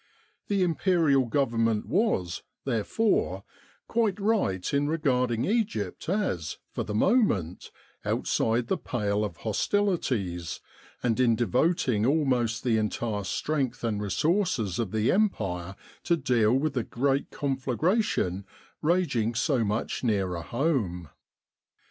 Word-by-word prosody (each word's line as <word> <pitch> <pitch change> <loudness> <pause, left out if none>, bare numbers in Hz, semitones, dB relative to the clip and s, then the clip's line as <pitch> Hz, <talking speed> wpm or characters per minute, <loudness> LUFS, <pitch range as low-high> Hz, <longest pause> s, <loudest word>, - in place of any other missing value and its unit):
The 200 -2 +2
Imperial 165 -6 +2
Government 115 -4 +1
was, 165 - 0 0.2
therefore, 135 - 0 0.4
quite 220 -4 +1
right 195 - 0
in 140 +1 +2
regarding 125 -7 +1
Egypt 190 - -1
as, 95 - -1
for - - -3
the 105 - -4
moment, 110 - +1 0.3
outside 115 +2 0
the - - -1
pale 105 -3 -1
of 105 - -4
hostilities, 110 - -1 0.4
and 120 -1 +1
in 120 -3 +4
devoting 125 -1 +1
almost 125 -6 +1
the 120 -3 +2
entire 105 -1 -1
strength 135 +5 -2
and 105 -3 -1
resources 130 - 0
of 115 -4 -1
the 110 +2 +1
Empire 95 - 0 0.3
to 170 - +3
deal 120 -6 +2
with 140 +3 +1
the 125 - 0
great 135 +4 0
conflagration 135 - 0 0.4
raging 145 -10 +1
so 125 0 +1
much 105 +4 -2
nearer 95 -7 0
home. 105 - -1
125 Hz, 115 wpm, -27 LUFS, 105-160 Hz, 0.4 s, in